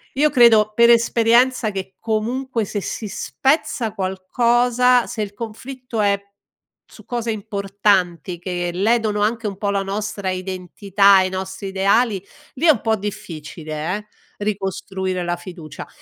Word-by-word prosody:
io 300 +3 +4
credo 225 -6 +5
per 235 +1 +6
esperienza 235 0 +3
che 190 -1 -6
comunque 230 +2 -2
se 205 +1 -4
si 215 - -5
spezza 245 +1 -1
qualcosa, 240 +6 +2
se 220 - -4
il 205 -1 -7
conflitto 235 +2 -6
è 200 -1 +2 0.6
su - - -17
cose 235 -2 -2
importanti 200 -4 0
che 175 -1 -3
ledono 215 +2 +1
anche 225 +1 0
un 200 -2 -5
po' 200 0 -2
la 200 -1 0
nostra 200 -1 -3
identità 190 +2 +2
e 185 - +1
i - - -5
nostri 190 +1 -5
ideali 200 +2 +2 0.3
lì 280 - -1
è - - +9
un 255 - -1
po' 225 -1 +1
difficile 170 -4 -5
eh, 210 0 -11 0.4
ricostruire 190 -2 -3
la 175 0 -2
fiducia. 175 -3 -9
205 Hz, 140 wpm, -20 LUFS, 190-230 Hz, 0.6 s, è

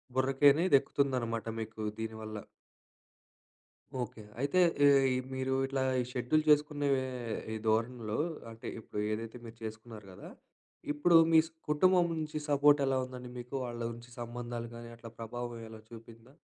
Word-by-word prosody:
బుర్రకనేది 140 +6 +4
ఎక్కుతుందనమాట 125 -6 -1
మీకు 110 0 -6 0.2
దీనివల్ల. 110 -1 -5 1.7
ఓకే. 110 -1 -9 0.2
అయితే 185 +6 +2 0.3
ఏయి 135 -2 +5 0.2
మీరు 130 0 -1
ఇట్లా 135 0 -2 0.2
ఈ - - -1
షెడ్యూల్ 135 +5 +1
జేసుకునే 150 -1 +3 0.7
ఈ - - -2
ధోరణిలో, 115 0 0 0.3
అంటే 115 0 -9
ఇప్పుడు 105 - -6
ఏదైతే 115 +2 -4
మీరు 115 0 -11
చేసుకున్నారు 110 -1 -8
గదా! 90 - -11 0.6
ఇప్పుడు 165 +3 +5 0.2
మీస్ 160 0 +6 0.2
కుటుంబం 180 +3 +4
నుంచి 155 -1 -3
సపోర్టెలా 140 -2 +4
ఉందండి 125 -1 -9
మీకు? 125 +3 -7
వాళ్ళ 120 -1 -5
ఉంచి 120 +1 -12
సంబంధాలు 120 0 -5
గాని 120 0 -9
అట్లా 115 -1 -10
ప్రభావం 120 +1 -5
ఎలా 110 -1 -10
చూపిందా? 115 +2 -13
120 Hz, 130 wpm, -32 LUFS, 115-140 Hz, 1.7 s, మీస్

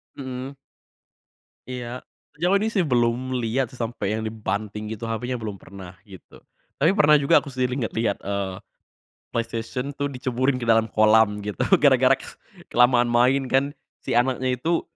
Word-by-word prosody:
Mhm. 130 0 -6 1.1
Iya. 125 -1 -6 0.4
Sejauh 180 +4 +2
ini, 220 - 0
sih, 190 -6 +1
belum 125 -1 0
liat 120 +3 0
sih 125 - -13
sampe 115 -2 -3
yang 110 +2 -2
dibanting 105 -1 -4
gitu 110 +2 -9
HP-nya, 120 +3 -3
belum 105 -3 -5
pernah, 95 -2 -12
gitu. 95 -4 -14 0.4
Tapi 160 +5 +4
pernah 150 -5 +6
juga 145 +4 +4
aku 145 - -8
sendiri 125 -1 -1
ngeliat-liat, 115 -4 -1
eee, 100 -1 -3 0.8
PlayStation 115 +4 -3
tuh 145 +1 -2
diceburin 130 +1 0
ke 120 - -3
dalam 115 0 +4
kolam 110 -1 +3
gitu 105 -2 -5 0.2
gara-gara - - +5
ke - - -12 0.5
kelamaan 120 0 +4
main, 130 +3 +3
kan. 135 +1 +3 0.4
Si - - -3
anaknya 130 0 +1
itu 165 +6 0
120 Hz, 150 wpm, -24 LUFS, 110-130 Hz, 1.1 s, pernah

